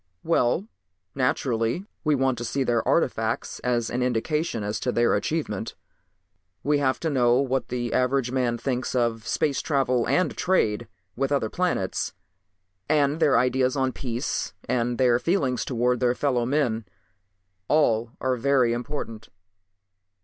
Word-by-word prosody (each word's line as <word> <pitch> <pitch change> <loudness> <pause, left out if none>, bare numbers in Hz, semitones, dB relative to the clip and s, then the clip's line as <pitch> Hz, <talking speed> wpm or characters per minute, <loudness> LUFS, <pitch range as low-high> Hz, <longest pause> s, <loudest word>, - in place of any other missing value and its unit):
"Well, 165 - +1 0.5
naturally 125 - 0 0.2
we 155 -2 +3
want 130 -2 +1
to - - -4
see 135 +3 -1
their 120 -2 +1
artifacts - - 0
as 120 -2 -1
an 125 - -1
indication 125 +1 -1
as 105 +2 -2
to - - -1
their 120 0 +2
advancement. 110 -2 -2 0.9
We 145 0 +2
have 130 -2 +1
to 160 - 0
know 125 -2 +3
what 135 -1 0
the 120 -1 -3
average 125 -1 +1
man 125 -2 0
thinks 130 +1 -2
of 115 -2 0
space 145 -3 0
travel 130 -5 +1
and 185 - +1
trade 120 - +1 0.3
with 135 +2 -1
other 135 -7 0
planets. 175 - -1 0.8
And 150 0 +2
their 155 -4 +4
ideas 130 +1 +2
on 130 -1 +1
peace 120 0 -3
and 120 -1 0
their 125 -2 +4
feelings 135 -7 0
towards 125 -1 0
their 125 -1 +2
fellow 125 -4 0
men. 125 -6 0 0.8
All 120 -7 +2
are 130 -1 0
very 130 -1 +3
important. 120 -3 -5
125 Hz, 140 wpm, -25 LUFS, 120-140 Hz, 0.9 s, their